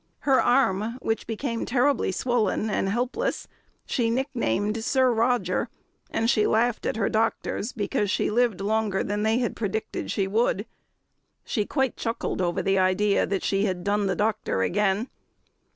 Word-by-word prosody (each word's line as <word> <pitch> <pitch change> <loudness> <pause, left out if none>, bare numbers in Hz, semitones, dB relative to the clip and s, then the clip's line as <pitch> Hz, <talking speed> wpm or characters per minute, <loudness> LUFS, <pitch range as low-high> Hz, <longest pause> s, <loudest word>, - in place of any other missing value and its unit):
Her 270 -2 +4
arm, 230 -2 +2
which 225 -3 -2
became 230 +1 -3
terribly 255 -2 +1
swollen 220 0 0
and 195 - 0
helpless, 250 - -2 0.4
she 235 -3 0
nicknamed 220 - -1
"Sir 260 0 +3
Roger," 240 +2 +1 0.4
and 225 - 0
she 215 -3 +3
laughed 230 +1 +1
at - - -1
her 210 - +1
doctors 225 +1 -1
because 205 -2 -1
she 205 - 0
lived 230 -4 +1
longer 210 -1 0
than 205 +1 -2
they 220 +2 +2
had 245 -2 -1
predicted 220 0 -3
she 195 - 0
would. 205 0 +1 0.8
She 210 -5 -1
quite 265 -4 0
chuckled 230 -4 -2
over 175 -1 0
the 195 0 +2
idea 185 +2 +2
that 195 -1 -2
she 195 +1 +1
had 180 -3 -2
"done 205 +1 +1
the - - 0
doctor 210 - 0
again." 205 - +1
220 Hz, 155 wpm, -25 LUFS, 200-240 Hz, 0.8 s, Her